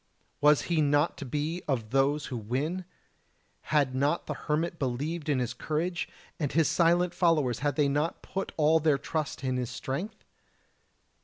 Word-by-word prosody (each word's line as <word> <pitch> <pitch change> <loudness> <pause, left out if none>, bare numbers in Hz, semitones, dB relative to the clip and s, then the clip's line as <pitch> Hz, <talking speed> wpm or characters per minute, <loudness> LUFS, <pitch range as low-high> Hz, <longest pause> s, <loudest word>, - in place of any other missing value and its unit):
Was 150 0 +5
he 170 -3 +1
not 145 +2 +2
to 140 - -5
be 150 +6 -2
of 120 -6 -1
those 140 +2 +2
who - - -2
win? 140 - -2 0.8
Had 145 -4 +1
not 140 +5 +1
the - - -3
hermit 165 +2 -2
believed 145 +5 -2
in 145 - +2
his 125 -2 -1
courage? 165 +2 -2 0.3
and 145 -4 -1
his 160 -1 +3
silent 175 +1 +3
followers 155 -10 +2
had 145 +1 0
they 150 -2 +3
not 145 +4 -1
put 195 0 -4
all 160 +1 +4
their 150 -2 +3
trust 150 -1 -3
in 130 -1 0
his 125 -2 -2
strength? 145 +12 -5
150 Hz, 165 wpm, -29 LUFS, 135-165 Hz, 0.8 s, Was